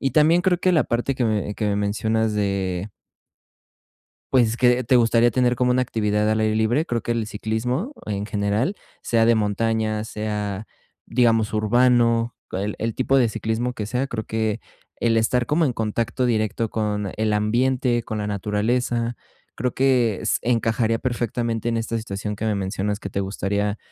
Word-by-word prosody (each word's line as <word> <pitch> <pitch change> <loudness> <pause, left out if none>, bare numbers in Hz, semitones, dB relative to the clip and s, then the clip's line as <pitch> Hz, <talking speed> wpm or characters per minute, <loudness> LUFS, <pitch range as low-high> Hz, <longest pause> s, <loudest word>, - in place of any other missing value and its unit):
Y 135 -2 0
también 160 +4 +5
creo 180 -1 +2
que 185 0 +2
la 160 - +3
parte 120 +3 -1
que 125 - 0
me 105 -2 -1
que 105 - -2
me 100 - 0
mencionas 110 +2 0
de 100 -2 -1 1.4
Pues, 120 -3 +3
que 125 0 +3
te 125 - +3
gustaría 120 0 +4
tener 125 +1 +2
como 125 0 +2
una 130 +1 +2
actividad 105 -2 0
al 110 0 +1
aire 110 0 +1
libre. 120 +9 +1
Creo 120 -5 -2
que 120 - -2
el 115 -2 -1
ciclismo 125 - -2
en 105 -1 -3
general 105 - 0 0.3
sea 115 -1 +2
de 115 - +5
montaña, 110 0 0
sea, 105 -1 -4 0.4
digamos 115 -3 +2
urbano, 115 +1 +3
co - - -5
el 100 +2 -2
el 115 0 -2
tipo 135 +1 +2
de 120 -4 +3
ciclismo 115 +3 -2
que 105 - -4
sea, 125 +5 -1
creo 110 -4 -4
que 110 0 -1 0.4
el 115 -1 +2
estar 120 +2 +2
como 155 +4 +2
en 130 - 0
contacto 115 +3 -1
directo 110 -1 0
con 105 -3 -2
el 110 -1 +1
ambiente, 120 +3 +1
con 110 - -4
la 105 - -2
naturaleza, 115 +4 -1 0.4
creo 125 +1 -2
que 125 -6 +2
s 110 - +1
encajaría 115 -1 +1
perfectamente 120 -1 -2
en 115 - 0
esta 115 0 -2
situación 105 -1 -4
que 110 - -4
me 110 -2 +1
mencionas 100 +2 -2
que 100 - -6
te - - -2
gustaría 100 +1 -1
115 Hz, 180 wpm, -23 LUFS, 105-120 Hz, 1.4 s, también